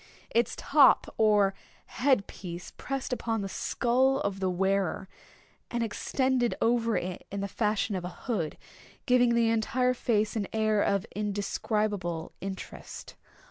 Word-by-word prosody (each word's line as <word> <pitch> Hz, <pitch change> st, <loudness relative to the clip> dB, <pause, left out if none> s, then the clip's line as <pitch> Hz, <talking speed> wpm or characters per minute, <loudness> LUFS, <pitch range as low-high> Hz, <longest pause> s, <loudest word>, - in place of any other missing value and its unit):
Its 235 Hz, +1 st, +1 dB
top 285 Hz, -1 st, +4 dB
or 210 Hz, -3 st, +4 dB, 0.3 s
head 255 Hz, -6 st, +2 dB
piece 175 Hz, -1 st, -8 dB
pressed 270 Hz, -1 st, -3 dB
upon 225 Hz, -3 st, -2 dB
the -, -, -3 dB
skull 255 Hz, +7 st, +1 dB
of 200 Hz, -1 st, -2 dB
the 190 Hz, -1 st, 0 dB
wearer, 190 Hz, 0 st, 0 dB, 0.6 s
and 235 Hz, -1 st, -1 dB
extended 250 Hz, +2 st, 0 dB
over 230 Hz, -1 st, +2 dB
it 180 Hz, 0 st, -5 dB
in 200 Hz, 0 st, -4 dB
the 200 Hz, -, -2 dB
fashion 210 Hz, +1 st, 0 dB
of 185 Hz, -2 st, -2 dB
a -, -, -3 dB, 0.2 s
hood, 175 Hz, -11 st, -2 dB, 0.5 s
giving 250 Hz, -2 st, +4 dB
to 235 Hz, -, +2 dB
the 230 Hz, -1 st, +3 dB
entire 250 Hz, +3 st, +1 dB
face 220 Hz, -3 st, 0 dB
an 205 Hz, -3 st, -1 dB
air 215 Hz, -1 st, +2 dB
of 200 Hz, -2 st, +1 dB
indescribable 205 Hz, -4 st, -2 dB
interest. 195 Hz, 0 st, -7 dB
215 Hz, 140 wpm, -29 LUFS, 195-240 Hz, 0.6 s, top